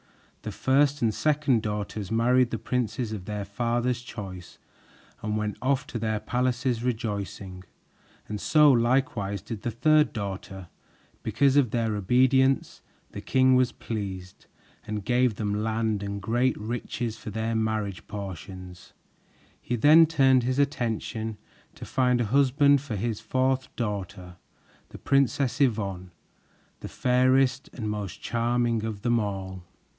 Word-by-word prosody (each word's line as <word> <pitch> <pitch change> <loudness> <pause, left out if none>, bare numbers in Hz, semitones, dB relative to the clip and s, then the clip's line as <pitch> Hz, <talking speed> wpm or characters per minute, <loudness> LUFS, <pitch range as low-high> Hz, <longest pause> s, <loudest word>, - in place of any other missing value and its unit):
The - - -5
first 140 +1 +2
and 110 -2 +2
second 150 -5 +1
daughters 105 -1 -4
married 125 +2 +3
the 115 - -3
princes 125 -1 -2
of 100 -4 -6
their 105 0 -4
father's 120 +4 -1
choice 95 -7 -9 0.6
and 105 0 -2
went 105 -1 -2
off 135 0 +1
to 115 - -5
their 110 -1 -1
palaces 125 0 -1
rejoicing, 100 -6 -4 0.6
and 105 -1 -5
so 150 -2 +5
likewise 115 -5 +1
did 110 -4 -6
the 120 - -2
third 155 +6 +3
daughter. 95 -4 -6 0.5
Because 135 +5 +2
of 140 -5 +4
their 115 -1 -1
obedience, 130 +6 +2 0.3
the - - -7
king 130 0 +3
was 125 -1 +3
pleased 95 -4 -6 0.4
and 105 -2 -4
gave 125 -2 +2
them 105 0 -2
land 110 -2 -1
and 100 0 -4
great 120 +6 +1
riches 115 +1 -4
for 115 - -8
their 110 +2 -2
marriage 110 -4 -2
portions. 90 -2 -8 0.7
He 120 - -2
then 155 +7 +7
turned 135 -5 +4
his 130 +2 -1
attention 115 -5 -1 0.4
to - - -9
find 125 -1 +1
a 120 - +1
husband 140 +3 +4
for 130 -6 -5
his 110 +1 -2
fourth 130 0 0
daughter, 100 -5 -5 0.5
the - - -10
Princess 140 0 +1
Yvonne, 100 -8 0 0.7
the - - -8
fairest 130 +1 +2
and 110 -4 -5
most 105 -3 -4
charming 120 -1 0
of 110 -3 -5
them 120 -1 +2
all. 95 -3 -4
115 Hz, 140 wpm, -26 LUFS, 105-130 Hz, 0.7 s, then